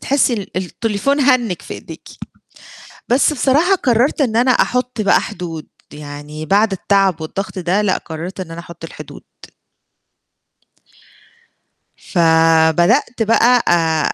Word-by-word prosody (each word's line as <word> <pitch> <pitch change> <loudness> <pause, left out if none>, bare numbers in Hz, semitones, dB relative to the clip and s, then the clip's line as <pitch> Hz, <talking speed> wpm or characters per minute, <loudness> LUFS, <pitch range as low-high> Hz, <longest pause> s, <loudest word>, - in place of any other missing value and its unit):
تحسي 275 -2 +1
ال 205 -5 -6
التليفون 220 +8 -2
هَنِّج 255 -9 +1
في - - -8
إيديكِ. - - -11 1.0
بس 265 +5 +3
بصراحة 300 +7 +2
قرّرت 255 -3 +1
إن 235 -6 0
أنا 250 +2 +3
أحُطّ 250 -1 0
بقى 200 -2 +3
حدود، 170 -7 -7 0.3
يعني 150 +1 -9
بعد 205 +4 +2
التعب 195 -2 +1
والضغط 190 +5 -5
ده 185 +3 0
لأ، 200 -3 +1
قرّرت 170 +4 -8
إن 175 - -7
أنا 165 +1 -7
أحُطّ 170 -1 -12
الحدود. - - -10 2.8
ف 180 - -5 0.5
بدأت 225 - +1
بقى 235 +2 +3
آآ 160 -2 +1
200 Hz, 125 wpm, -17 LUFS, 170-250 Hz, 2.8 s, بس